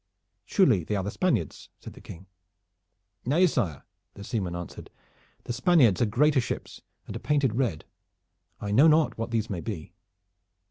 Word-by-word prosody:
"Surely 125 - +3
they 105 - -2
are 95 - -1
the 100 - -3
Spaniards?" 170 - -1
said - - -10
the - - -14
King. 85 +3 -11 1.0
"Nay, 155 +9 +3
sire," 110 - -1 0.3
the 100 - -9
seaman 95 -5 -3
answered, 85 0 -8 0.5
"the 120 - -4
Spaniards 130 - +4
are 120 - +3
greater 140 +5 +3
ships 120 - -6 0.2
and - - -8
are - - -4
painted 140 -6 +1
red. 115 - -1 0.7
I 100 - -4
know 135 +10 +6
not 155 -5 +3
what 115 - -3
these 115 -2 -1
may 95 -6 -4
be." 100 -7 -6
115 Hz, 165 wpm, -27 LUFS, 95-145 Hz, 1.0 s, know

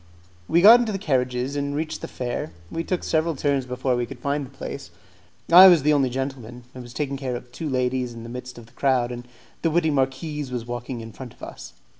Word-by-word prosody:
We 170 - +3
got 230 +4 +10
into 235 -3 -1
the 195 - -2
carriages, 130 -5 -1
and 140 0 -2
reached 155 +1 -3
the - - -5
fair. 120 -9 -4 0.2
We 165 - -2
took 180 +1 -2
several 160 0 0
turns 140 -2 0
before 125 0 -1
we 120 -1 -1
could 135 - -9
find 140 +3 -2
the 130 - -9
place. 140 0 -7 0.6
I 185 +3 +11
was 170 -6 +6
the 150 +1 +4
only 135 -3 +2
gentleman; 125 -2 -5
I 130 - -9
was 120 -1 -10
taking 140 -2 -2
care 130 -2 -3
of 120 0 -9
two 155 +4 -5
ladies 125 -1 0
in 115 -1 -9
the - - -8
midst 125 +1 -8
of 120 - -11
the 115 - -22
crowd, 125 -2 +1
and 120 0 -7 0.3
the 165 - +2
witty 160 0 +2
marquise 140 +1 -1
was 120 -2 -4
walking 120 0 -5
in 115 0 -9
front 125 -1 -10
of - - -20
us. - - -9
130 Hz, 235 wpm, -24 LUFS, 125-150 Hz, 0.6 s, I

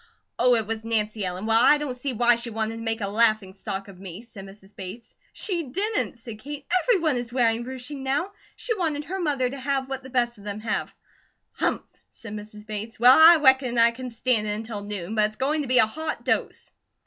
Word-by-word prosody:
"Oh, 245 0 +5
it 225 -2 0
was 220 +1 -4
Nancy 215 -2 -1
Ellen! 185 +2 -4
Well, 225 +1 +4
I 295 +4 +6
don't 295 -3 -3
see 255 +2 -4
why 240 0 +4
she 235 +1 -6
wanted 225 0 -3
to - - -7
make 225 0 -2
a 200 - -1
laughing 215 -2 +2
stock 195 0 -5
of 190 -2 -13
me," 190 +2 -9
said 220 -5 -11
Mrs. 195 0 -16
Bates. 195 +5 -9 0.2
"She 360 -5 -2
didn't!" 385 - -1
said 230 -2 -10
Kate. 285 +3 -8 0.2
"Everyone 335 - +2
is 240 -1 -5
wearing 235 -2 +1
ruching 260 +3 -6
now; 275 +9 -1 0.2
she 460 - -3
wanted 310 -6 -1
her 380 +5 -4
mother 280 -6 +1
to 270 +2 -6
have 270 0 -1
what 270 0 -4
the 260 - -11
best 240 -3 0
of - - -14
them 205 +1 -5
have." 225 - -2 0.6
"Humph!" - - -1 0.3
said 225 -3 -10
Mrs. 210 0 -9
Bates. 215 +1 -6
"Well, 250 +2 +8
I 325 +2 +9
reckon 265 -2 +4
I 230 0 +6
can 255 +2 -7
stand 230 -2 0
it 210 - -1
until 220 -1 -6
noon, 205 -1 -5
but 215 -1 +3
it's 215 0 -3
going 295 +5 0
to 280 - -4
be 255 0 +3
a 225 - +7
hot 310 +8 -5
dose." - - -1
235 Hz, 225 wpm, -25 LUFS, 215-270 Hz, 0.6 s, I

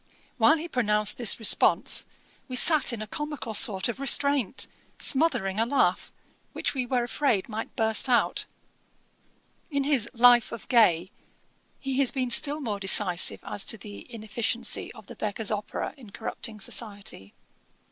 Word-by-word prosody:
While 300 +8 +4
he 325 +2 -6
pronounced 210 - 0
this 235 -4 +2
response, 225 - +1 0.4
we 255 - -6
sat 305 +2 +6
in 225 -3 -5
a - - -7
comical 295 -1 -6
sort 205 -3 +4
of 235 +1 -5
restraint, 275 -3 +1 0.3
smothering 240 -10 +1
a 225 - +2
laugh, 235 -10 0 0.4
which - - -2
we 255 -3 -3
were 245 -1 0
afraid 240 -5 -1
might 220 0 -7
burst 220 +3 +2
out. 245 - +1 1.2
In 280 -3 -1
his 270 -5 0
Life 240 -1 +4
of 230 -3 -9
Gay, 190 -7 +3 0.7
he 270 -1 -3
has 270 -3 +4
been 255 -2 -3
still 290 +5 +3
more 215 -6 -4
decisive 190 -2 +2
as 200 - -1
to 225 - 0
the 205 +3 -12
inefficiency 225 +1 -3
of - - -15
The - - -12
Beggar's 215 0 -3
Opera 210 -1 -4
in 240 -6 -14
corrupting 215 +1 -7
society. 200 - -3
235 Hz, 150 wpm, -26 LUFS, 210-265 Hz, 1.2 s, sat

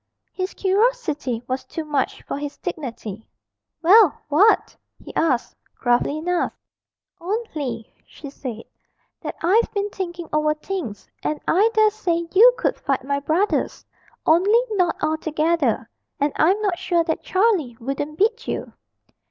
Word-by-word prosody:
His 370 0 -4
curiosity 380 - 0
was 260 +1 -2
too 320 - -6
much 290 -3 -1
for - - -4
his 290 0 -6
dignity. 235 - -6 0.6
'Well 385 0 +6
what?' 380 +10 +4 0.2
he - - -12
asked, 265 -7 +1 0.2
gruffly 245 +4 +1
enough. 350 +3 0 0.7
'Only,' 315 - -4
she 285 -2 -10
said, 240 -5 -7 0.6
'that - - -5
I've 415 +8 +3
been 405 0 -1
thinking 345 -3 -5
over 305 0 +2
things, 305 - -5
and 305 - -2
I 405 +6 +4
dare 435 -1 +5
say 340 -5 -1
you 455 +6 +8
could - - -1
fight 275 -3 -1
my 280 +1 -1
brothers 325 +8 0 0.4
only 385 +8 +5
not 365 -5 +1
all 310 +1 +1
together 310 -7 0 0.3
and 285 0 +1
I'm 370 +7 +3
not 390 -5 0
sure 345 -2 +1
that 320 -1 -2
Charlie 370 - +1
wouldn't 275 +5 -4
beat 450 +4 +1
you.' - - -4
325 Hz, 140 wpm, -22 LUFS, 280-390 Hz, 0.7 s, you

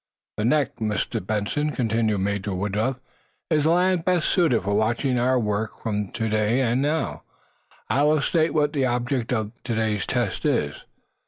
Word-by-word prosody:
"The 105 - 0
neck, 145 +3 +1
Mr. 105 -5 -2
Benson," 110 +10 -1
continued 110 -5 0
Major 100 0 -2
Woodruff, 105 +7 -1 0.5
"is 150 -2 +3
the - - +4
land 180 0 +2
best 180 -2 +1
suited 160 - +2
for 100 +2 -1
watching 120 +4 +1
our 130 +1 +2
work 105 -1 -1
from 105 -3 -2
to 115 -2 -1
day. 110 +3 +1
And 125 +1 +1
now, 150 +3 -1 0.7
I 140 - +1
will 150 +1 +4
state 160 +2 +1
what 150 -1 +2
the 135 -3 +1
object 120 0 -1
of 110 -3 -1
to 120 -2 -2
day's 110 -4 0
tests - - -1
is. - - -1
120 Hz, 170 wpm, -24 LUFS, 105-145 Hz, 0.7 s, the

